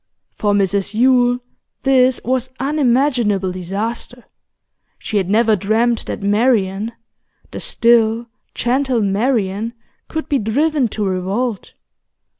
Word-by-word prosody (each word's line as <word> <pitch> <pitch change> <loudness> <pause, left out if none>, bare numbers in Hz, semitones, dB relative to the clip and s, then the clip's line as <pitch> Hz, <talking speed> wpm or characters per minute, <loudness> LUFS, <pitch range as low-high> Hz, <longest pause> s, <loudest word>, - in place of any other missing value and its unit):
For 205 -1 0
Mrs 200 +1 0
Yule 245 0 +4 0.5
this 260 -2 +3
was 255 +1 0
unimaginable 250 -8 +1
disaster. 215 +7 -5 0.7
She 215 - -3
had 190 -2 0
never 220 +1 +3
dreamt 220 +4 0
that - - -5
Marian, 210 -1 +1 0.6
the - - -6
still, 230 0 +2 0.3
gentle 255 -1 0
Marian, 210 +1 0 0.3
could 315 0 -4
be 280 - +1
driven 275 +5 +1
to 210 -1 -3
revolt. 195 +4 -2
230 Hz, 105 wpm, -18 LUFS, 205-255 Hz, 0.7 s, Yule